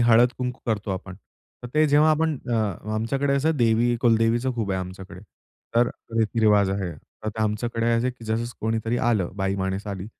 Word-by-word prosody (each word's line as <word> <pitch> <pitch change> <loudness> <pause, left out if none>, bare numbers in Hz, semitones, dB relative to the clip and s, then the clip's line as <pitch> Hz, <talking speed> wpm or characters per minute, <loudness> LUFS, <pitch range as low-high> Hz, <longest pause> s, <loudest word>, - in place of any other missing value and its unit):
हळद-कुंकू 125 +2 +3
करतो 105 -2 -1
आपण. 95 0 -5 0.5
तर 125 - -6
ते 155 0 +5
जेव्हा 150 +2 +5
आपण 155 -2 +1
अ, - - +2 0.4
आमच्याकडे 135 +6 0
असं 155 +3 +1
देवी, 120 0 +3
कुलदेवीचं 120 +1 +2
खूप 110 -4 -2
आहे 95 -1 0
आमच्याकडे, 95 0 -9 0.5
तर 120 +1 +4 0.3
रीती-रिवाज 105 -3 +3
आहे. 95 -3 -2 0.3
तर - - -1
ते 110 +1 -3
आमच्याकडे 115 +2 -1
असं 115 +1 +2
आहे 130 - +1
की 120 -2 -14
जसं 110 +1 -1 0.2
कोणीतरी 115 +1 -1
आलं, 110 -8 +1
बाईमाणूस 95 0 -2
आली 100 -2 -5
115 Hz, 170 wpm, -24 LUFS, 100-125 Hz, 0.5 s, ते